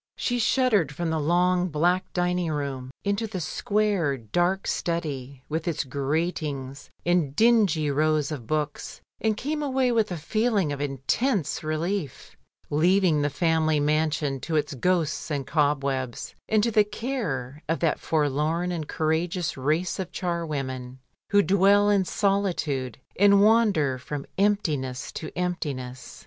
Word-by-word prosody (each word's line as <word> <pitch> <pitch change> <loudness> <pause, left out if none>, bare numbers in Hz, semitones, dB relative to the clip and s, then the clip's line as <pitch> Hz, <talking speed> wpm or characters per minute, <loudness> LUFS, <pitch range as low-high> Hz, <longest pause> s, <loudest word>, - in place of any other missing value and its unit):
She 245 -1 -1
shuddered 220 - +2
from 165 +2 -3
the 160 - 0
long, 180 +3 +2
black 175 +4 +1
dining 180 -2 0
room, 140 -3 -3
into 200 +3 0
the 195 -3 -5
square, 190 -3 0
dark 175 - 0
study, 140 -6 -3
with 160 +2 -3
its 165 - 0
gratings 140 -1 -3 0.2
and 170 -5 +1
dingy 205 -10 +3
rows 155 0 +1
of 130 -7 -6
books, 150 0 -3 0.2
and 220 -1 0
came 300 +5 -2
away 265 -3 +1
with 225 -4 +1
a 175 - -2
feeling 205 0 0
of 140 - -5
intense 145 - -1
relief, 155 0 -3 0.4
leaving 170 +1 +3
the 145 - +1
family 160 0 +1
mansion 150 -2 0
to 160 +5 -3
its 150 -1 0
ghosts 160 +1 0
and 140 -3 -2
cobwebs, 140 -5 -1 0.2
and 215 -1 +3
to 235 - +1
the 215 -1 +5
care 190 - -4
of 165 - +1
that 165 -3 +1
forlorn 155 +3 0
and 160 -4 -4
courageous 160 +1 -1
race 155 +8 -1
of 185 -2 -4
charwomen 135 -8 -3 0.3
who 205 0 +4
dwell 200 +2 +4
in 195 -2 +3
solitude 180 - 0 0.2
and 200 0 +6
wander 205 - +3
from 140 +2 -5
emptiness 150 -11 0
to 155 - -6
emptiness. 140 -8 -4
160 Hz, 140 wpm, -26 LUFS, 145-195 Hz, 0.4 s, and